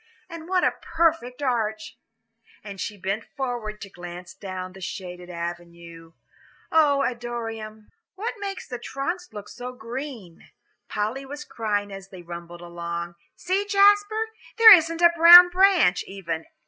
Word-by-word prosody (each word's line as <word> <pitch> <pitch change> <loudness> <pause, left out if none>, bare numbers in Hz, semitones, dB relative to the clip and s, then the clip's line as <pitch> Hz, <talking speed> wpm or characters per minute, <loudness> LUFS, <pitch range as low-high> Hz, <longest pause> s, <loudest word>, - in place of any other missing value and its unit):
"And 335 -1 -10
what 370 -1 +1
a - - +2
perfect 315 -6 0
arch!" 220 -4 -2 0.7
And 200 -2 -8
she 210 - -5
bent 195 +3 -3
forward 240 -6 -5
to 200 - -8
glance 175 0 -10
down 185 -2 -7
the 190 - -13
shaded 180 -1 -7
avenue. 170 -1 -8 0.6
"Oh, 290 -3 +3
Adoniram!" 225 -3 -6 0.2
"What 430 +5 -4
makes 395 -1 -6
the 245 - -6
trunks 345 +9 -5
look 210 -1 -9
so 250 +1 -8
green?" 235 - -8 0.4
Polly 215 +6 -3
was 290 +2 -8
crying 205 -3 -3
as 195 0 -10
they 185 -2 -12
rumbled 170 0 -9
along. 170 0 -6 0.2
"See, 375 +3 -1
Jasper, 410 +2 +3 0.3
there 450 -2 +11
isn't 330 -1 +2
a 340 0 +7
brown 345 +2 +10
branch, 360 - +3
even. 170 -5 -5
225 Hz, 140 wpm, -24 LUFS, -, 0.7 s, there